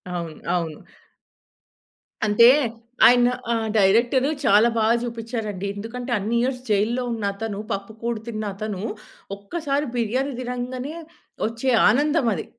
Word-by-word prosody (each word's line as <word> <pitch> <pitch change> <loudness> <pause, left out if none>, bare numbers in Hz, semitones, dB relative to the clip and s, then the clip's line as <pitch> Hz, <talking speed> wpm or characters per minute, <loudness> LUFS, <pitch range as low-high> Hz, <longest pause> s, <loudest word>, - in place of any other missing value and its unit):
అవును. 170 -3 -5 0.2
అవును. 160 -3 -3 1.5
అంటే 215 +3 +6 0.6
ఆయన 245 0 +5 0.2
ఆహ్, 225 -1 0
డైరెక్టరు 235 +7 +3 0.2
చాలా 215 +4 +5
బా 220 - +2 0.2
జూపిచ్చారండి. 225 -4 -4
ఎందుకంటే 240 +4 -6
అన్ని 215 +4 -2
ఇయర్స్ 250 +1 -1
జైల్‌లో 215 +5 +1
ఉన్నతను 205 -1 -3
పప్పు 200 +2 -4
కూడు 235 -1 -2
తిన్న 215 -2 -4
అతను 205 -2 -4 0.6
ఒక్కసారి 285 +7 -2
బిర్యానీ 255 +4 -1
తినంగానే 250 +4 -4 0.5
వచ్చే 230 +3 -2 0.2
ఆనందమది. 255 - +1
230 Hz, 110 wpm, -23 LUFS, 205-250 Hz, 1.5 s, అంటే